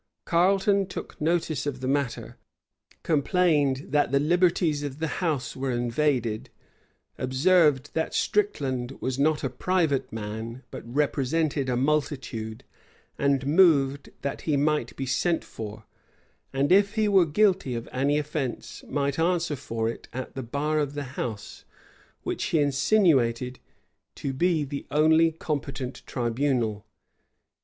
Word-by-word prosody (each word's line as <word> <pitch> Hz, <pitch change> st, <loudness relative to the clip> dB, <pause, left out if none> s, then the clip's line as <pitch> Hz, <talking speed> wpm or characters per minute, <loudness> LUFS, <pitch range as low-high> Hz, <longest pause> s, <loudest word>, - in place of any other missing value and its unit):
Carleton 195 Hz, +3 st, +3 dB
took 185 Hz, -, -8 dB
notice 160 Hz, -3 st, 0 dB
of 135 Hz, -3 st, -3 dB
the 130 Hz, -, -4 dB
matter; 140 Hz, -2 st, -2 dB, 0.7 s
complained 150 Hz, -3 st, +2 dB
that 145 Hz, -3 st, +2 dB
the 140 Hz, -, +3 dB
liberties 170 Hz, -1 st, +2 dB
of 145 Hz, -2 st, -5 dB
the 160 Hz, -, -2 dB, 0.2 s
house 155 Hz, -8 st, -1 dB
were 135 Hz, 0 st, -3 dB
invaded; 120 Hz, -2 st, 0 dB, 0.7 s
observed 145 Hz, +1 st, +3 dB
that 160 Hz, -, -1 dB
Stricland 135 Hz, -11 st, -1 dB
was 130 Hz, 0 st, -2 dB
not 150 Hz, +1 st, +2 dB
a -, -, +1 dB
private 160 Hz, 0 st, 0 dB
man, 110 Hz, +3 st, -6 dB
but -, -, -6 dB
represented 145 Hz, 0 st, 0 dB
a 125 Hz, -, +1 dB
multitude: 135 Hz, -6 st, -1 dB, 0.6 s
and 140 Hz, -1 st, +2 dB
moved 145 Hz, -4 st, +4 dB
that 140 Hz, -, -3 dB
he 150 Hz, -3 st, 0 dB
might 150 Hz, -4 st, 0 dB
be 135 Hz, -, -3 dB
sent 165 Hz, +6 st, 0 dB
for, 110 Hz, 0 st, -8 dB, 0.7 s
and 135 Hz, +3 st, 0 dB
if 200 Hz, +2 st, +4 dB
he 215 Hz, -1 st, +2 dB
were 195 Hz, -3 st, +5 dB
guilty 190 Hz, -, +2 dB
of 115 Hz, 0 st, -5 dB
any 140 Hz, +3 st, +1 dB
offence, 150 Hz, -4 st, -4 dB
might 140 Hz, 0 st, -1 dB
answer 170 Hz, -2 st, +1 dB
for 115 Hz, -4 st, -3 dB
it 115 Hz, -, -5 dB
at 130 Hz, +1 st, -6 dB
the 135 Hz, -, -4 dB
bar 145 Hz, +5 st, -1 dB
of 145 Hz, -1 st, -2 dB
the 145 Hz, -, -3 dB
house, 110 Hz, -7 st, -5 dB, 0.6 s
which -, -, -2 dB
he 165 Hz, -, +1 dB
insinuated 135 Hz, -, +2 dB, 0.6 s
to 135 Hz, -, -4 dB
be 165 Hz, +2 st, +1 dB
the 140 Hz, 0 st, -6 dB
only 160 Hz, +3 st, +4 dB
competent 140 Hz, -4 st, -4 dB
tribunal. 120 Hz, -3 st, -1 dB
145 Hz, 135 wpm, -26 LUFS, 130-160 Hz, 0.7 s, were